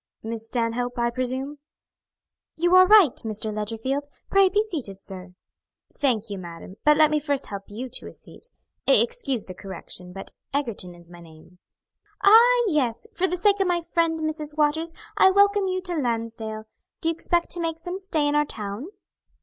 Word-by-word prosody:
"Miss 225 0 -5
Stanhope, 245 +1 -2
I 235 0 +1
presume?" 260 +4 -4 1.0
"You 350 +2 +1
are 370 0 +8
right, 400 - +7
Mr. 215 -1 -2
Ledgerfield. 225 +7 -3 0.2
Pray 390 -1 +5
be 415 +2 +2
seated, 280 - -6
sir." 185 -2 -7 0.6
"Thank 235 -6 0
you, 200 - -4
madam, 175 +2 -10
but 300 0 +5
let 310 -1 +5
me 305 - +2
first 285 -2 -1
help 200 -1 -7
you 230 +5 -6
to 255 - -3
a - - -10
seat. - - -14 0.4
Excuse 450 - +2
the 185 - -8
correction, 180 -1 -8
but 195 +1 -9 0.2
Egerton 225 -10 -2
is 175 0 -18
my 175 - -12
name." 165 +2 -17 0.6
"Ah, 475 +4 +7
yes! 285 - 0
For 375 -2 +1
the 360 - -2
sake 405 +2 +3
of 390 - +2
my 350 -1 +2
friend, 330 -1 0
Mrs. 310 -1 -4
Waters, 315 +2 +1 0.3
I 380 - +7
welcome 400 0 +3
you 370 0 -1
to 360 -2 -1
Lansdale. 230 -5 -3 0.4
Do 325 - +2
you - - +1
expect 345 +1 0
to 345 - +2
make 325 -1 -2
some 355 +3 -5
stay 330 -7 -1
in 290 - 0
our 295 0 +3
town?" 210 +2 -6
285 Hz, 180 wpm, -24 LUFS, 220-345 Hz, 1.0 s, are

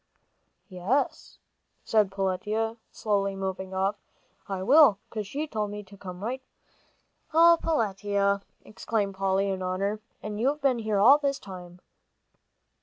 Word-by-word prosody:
"Yes," 200 +8 -2 0.5
said 215 -3 +2
Peletiah, 210 +4 -1
slowly 200 -2 -1
moving 190 -1 -4
off, 195 +2 0 0.5
"I 190 -1 -3
will, 275 -2 +6
'cause 215 -3 -4
she 290 +8 -3
told 215 -8 -3
me 210 0 -6
to 200 +1 -15
come 185 -1 -9
right 255 +4 -3
back." 285 - -26
"Oh, 335 0 +7
Peletiah!" 200 -8 0 0.3
exclaimed 205 0 -2
Polly, 195 +1 0
in 190 -1 -3
horror, 195 +3 -1 0.2
"and 210 0 -5
you've 275 +6 +1
been 270 -4 +2
here 215 -2 -1
all 255 +9 +7
this 280 -2 0
time!" 180 -2 -11
205 Hz, 135 wpm, -27 LUFS, 195-230 Hz, 0.5 s, Oh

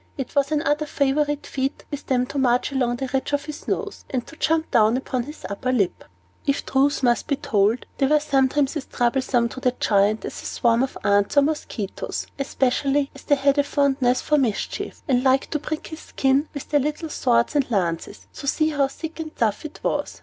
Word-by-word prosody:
It 270 -3 -5
was 280 +1 +2
another 300 0 +1
favorite 290 +1 0
feat 270 +1 -3
with 290 - -6
them 250 -1 +2
to 280 +2 -4
march 250 +1 +2
along 250 -3 +1
the 265 - -3
bridge 265 +2 -2
of 285 0 0
his 305 -1 -8
nose, 420 -2 -3
and 250 -3 -2
jump 320 +1 +1
down 225 -1 +4
upon 260 -1 -2
his 295 -7 -10
upper 200 +6 -2
lip. 205 -8 0 0.4
If 280 - 0
the - - -9
truth 275 +1 +2
must 240 -2 +2
be 280 - +1
told, 225 -5 +1
they 270 - +3
were 300 +2 +4
sometimes 275 0 +1
as 300 - -4
troublesome 245 0 +1
to 260 - -8
the 250 -1 +1
Giant 205 +1 +2
as - - -6
a - - -12
swarm 235 0 +2
of 265 - -2
ants 205 +4 +2
or 285 - +7
mosquitoes, 280 -9 -3
especially 275 +1 +1
as - - -12
they 290 - +4
had 280 +1 +2
a - - +5
fondness 270 -3 +2
for 300 -1 +3
mischief, 230 -7 -2
and 255 -3 +2
liked 265 0 +2
to 300 - 0
prick 305 +1 -4
his 315 - -8
skin 275 +1 +1
with 285 - -7
their 295 - +3
little 300 +3 -2
swords 240 -1 +1
and 280 -3 +2
lances, 180 -2 -2
to 280 - -8
see 310 +2 +2
how 285 -3 +2
thick 320 +4 -8
and 315 -1 -6
tough 215 +3 0
it 310 - -8
was. - - -2
270 Hz, 210 wpm, -23 LUFS, 245-290 Hz, 0.4 s, or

